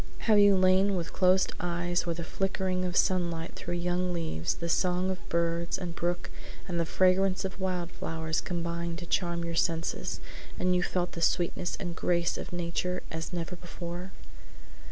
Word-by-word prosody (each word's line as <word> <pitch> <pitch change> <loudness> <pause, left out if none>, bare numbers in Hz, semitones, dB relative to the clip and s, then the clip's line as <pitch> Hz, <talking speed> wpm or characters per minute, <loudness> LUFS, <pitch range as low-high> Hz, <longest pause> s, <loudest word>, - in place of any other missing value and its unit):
Have 215 -2 +6
you 205 -1 +7
lain 185 +2 +4
with 170 -2 -2
half - - -16
closed 185 0 +4
eyes 175 0 0
where 170 - 0
the 170 - -4
flickering 190 0 -1
of 180 0 -1
sunlight 170 -3 +1
through 175 - -4
young 180 +1 0
leaves, 160 - -1
the 170 - -4
song 180 +2 +2
of 185 - -7
birds 170 +1 +1
and 175 -3 -5
brook 175 +1 -2 0.4
and 175 -2 -1
the 165 - +1
fragrance 185 +1 +3
of 190 0 -5
wild 180 -2 -1
flowers 160 -1 -2
combined 170 -1 -3
to 175 - -6
charm 170 -1 0
your 170 - -3
senses, 165 0 0 0.4
and 180 0 +2
you 180 - +3
felt 180 0 0
the 170 - -6
sweetness 175 +1 +1
and 175 -3 -4
grace 170 0 +1
of - - -6
nature 175 +1 -2
as 160 +1 -4
never 175 0 -3
before? 175 +1 -7
175 Hz, 175 wpm, -30 LUFS, 170-185 Hz, 0.4 s, you